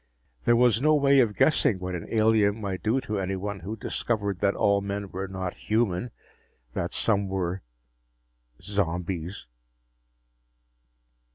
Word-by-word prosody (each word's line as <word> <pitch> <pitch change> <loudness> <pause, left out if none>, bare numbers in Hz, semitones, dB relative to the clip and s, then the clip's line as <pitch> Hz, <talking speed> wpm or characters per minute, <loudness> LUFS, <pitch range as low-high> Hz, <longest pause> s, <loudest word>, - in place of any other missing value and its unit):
There 120 - +5
was 120 -1 +4
no 155 +1 +4
way 140 -1 +4
of 110 -5 +3
guessing 135 -9 +3
what 90 0 -5
an 90 - -5
alien 110 -1 +3
might 100 -3 -4
do 115 +5 +1
to 105 -4 -3
anyone 95 +1 -3
who 100 +6 -5
discovered 100 -3 -2
that 100 0 +2
all 100 0 +2
men 100 0 -4
were 95 +1 -4
not 95 -1 -4
human 110 -1 -1 0.6
that - - -2
some 100 -3 +1
were... 95 -1 -2 1.0
zombies. 90 -2 -3
100 Hz, 130 wpm, -26 LUFS, 95-110 Hz, 1.0 s, There